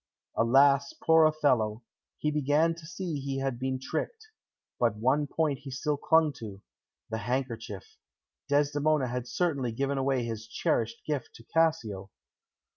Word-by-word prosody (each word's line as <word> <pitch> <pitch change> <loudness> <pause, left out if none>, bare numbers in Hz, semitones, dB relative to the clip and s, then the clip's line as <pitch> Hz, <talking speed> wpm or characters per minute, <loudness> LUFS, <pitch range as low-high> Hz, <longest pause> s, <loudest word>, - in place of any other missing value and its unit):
Alas, 140 +4 +4
poor 160 -1 +4
Othello, 125 -8 +2 0.3
he 150 - 0
began 150 +3 +2
to 165 -2 -12
see 175 -3 -4
he 135 0 -3
had 135 -3 -2
been 130 0 -2
tricked. 440 - -4 0.5
But 120 -4 +2
one 130 +7 +1
point 150 -1 0
he 140 -1 -9
still 145 +3 -1
clung 155 +1 +3
to 100 -3 -8 0.5
the 110 - -2
handkerchief. 125 - -4 0.5
Desdemona 145 0 +2
had 125 0 -3
certainly 140 -7 0
given 135 +4 -1
away 135 -2 +1
his 115 -1 -5
cherished 115 0 -1
gift 145 -5 -3
to 115 - -13
Cassio. 120 - 0
135 Hz, 140 wpm, -29 LUFS, 120-155 Hz, 0.5 s, Alas